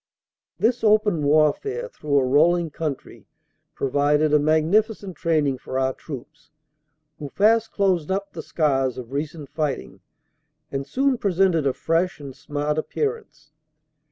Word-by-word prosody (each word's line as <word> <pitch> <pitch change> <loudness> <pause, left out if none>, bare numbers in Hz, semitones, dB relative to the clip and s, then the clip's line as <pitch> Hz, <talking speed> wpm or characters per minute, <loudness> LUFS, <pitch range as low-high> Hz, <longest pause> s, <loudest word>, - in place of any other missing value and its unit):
This 240 +1 +1
open 210 -6 +3
warfare 155 - +1
through 150 - -2
a 135 - +3
rolling 165 +5 +3
country 150 -3 -6 0.5
provided 145 +3 +1
a 150 - +6
magnificent 185 +6 +1
training 150 -6 0
for 130 - -5
our 130 0 +1
troops, 145 +2 -10 0.7
who 145 -2 -6
fast 220 +6 +2
closed 185 -6 +1
up 195 +1 -2
the - - -6
scars 135 -5 0
of 125 -1 -8
recent 145 0 -4
fighting 135 -11 -3 0.7
and 135 0 -4
soon 265 - +1
presented 180 -6 +2
a 135 - +1
fresh 165 +4 -1
and 140 -3 -9
smart 145 +3 -2
appearance. 425 - -4
155 Hz, 130 wpm, -23 LUFS, 145-195 Hz, 0.7 s, a